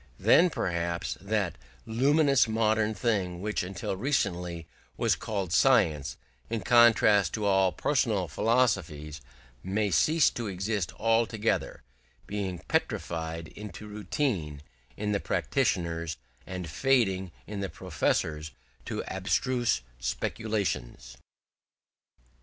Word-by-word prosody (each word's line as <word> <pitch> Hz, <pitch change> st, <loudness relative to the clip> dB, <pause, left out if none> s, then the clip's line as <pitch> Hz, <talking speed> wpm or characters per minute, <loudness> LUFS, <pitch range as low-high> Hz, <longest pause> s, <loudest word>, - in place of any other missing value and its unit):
Then 180 Hz, +2 st, +5 dB
perhaps 85 Hz, -, -2 dB
that 100 Hz, -4 st, -1 dB, 0.3 s
luminous 140 Hz, +4 st, +3 dB
modern 110 Hz, -1 st, +1 dB
thing 95 Hz, -5 st, -1 dB
which 105 Hz, +3 st, -1 dB
until 95 Hz, +1 st, -4 dB
recently 90 Hz, -, -1 dB, 0.3 s
was -, -, +2 dB
called 100 Hz, -5 st, -3 dB
science, 80 Hz, -, +3 dB, 0.3 s
in 115 Hz, -1 st, -2 dB
contrast 110 Hz, -3 st, +5 dB
to 105 Hz, -2 st, -2 dB
all 95 Hz, -2 st, +3 dB
personal 110 Hz, -10 st, 0 dB
philosophies, 85 Hz, -, 0 dB, 0.4 s
may 100 Hz, +2 st, -1 dB
cease 155 Hz, -, +4 dB
to 120 Hz, -2 st, -4 dB
exist 95 Hz, -1 st, -2 dB
altogether, 115 Hz, -, 0 dB, 0.4 s
being 100 Hz, -3 st, -3 dB
petrified 80 Hz, -1 st, -2 dB
into 105 Hz, 0 st, -9 dB
routine 100 Hz, -, -2 dB, 0.3 s
in 105 Hz, 0 st, -2 dB
the 100 Hz, -, +1 dB
practitioners, 85 Hz, -5 st, -1 dB, 0.3 s
and 90 Hz, -2 st, -5 dB
fading 95 Hz, -, +1 dB
in 105 Hz, -1 st, -6 dB
the 100 Hz, -1 st, -3 dB
professors 80 Hz, -2 st, -1 dB, 0.3 s
into -, -, -5 dB
abstruse 120 Hz, -, 0 dB, 0.2 s
speculations. 65 Hz, -, -3 dB
100 Hz, 100 wpm, -28 LUFS, 85-110 Hz, 0.4 s, Then